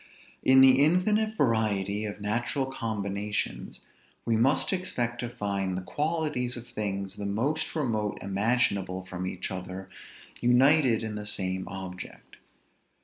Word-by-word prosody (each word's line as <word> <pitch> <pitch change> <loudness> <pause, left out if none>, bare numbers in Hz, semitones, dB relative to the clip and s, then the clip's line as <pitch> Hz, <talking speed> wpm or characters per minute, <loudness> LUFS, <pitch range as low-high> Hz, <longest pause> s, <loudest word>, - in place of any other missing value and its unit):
In 130 0 +6
the 135 +1 +7
infinite 210 +7 +2
variety 105 -5 +1
of 105 -1 -5
natural 120 +6 -1
combinations, 105 -5 -3 0.4
we 115 - +2
must 135 - +2
expect 125 -11 -2
to 120 - -3
find 100 -5 -2
the 95 - -4
qualities 150 - -1
of 120 - -7
things 100 -2 -4
the 100 - -3
most 135 +13 -1
remote 110 -9 -1
imaginable 100 -2 0
from 90 0 -5
each - - -3
other 95 0 -6 0.5
united 125 -1 +4
in 110 -1 -3
the 105 0 -5
same 95 -2 0
object. 95 -2 -8
110 Hz, 130 wpm, -28 LUFS, 100-130 Hz, 0.5 s, the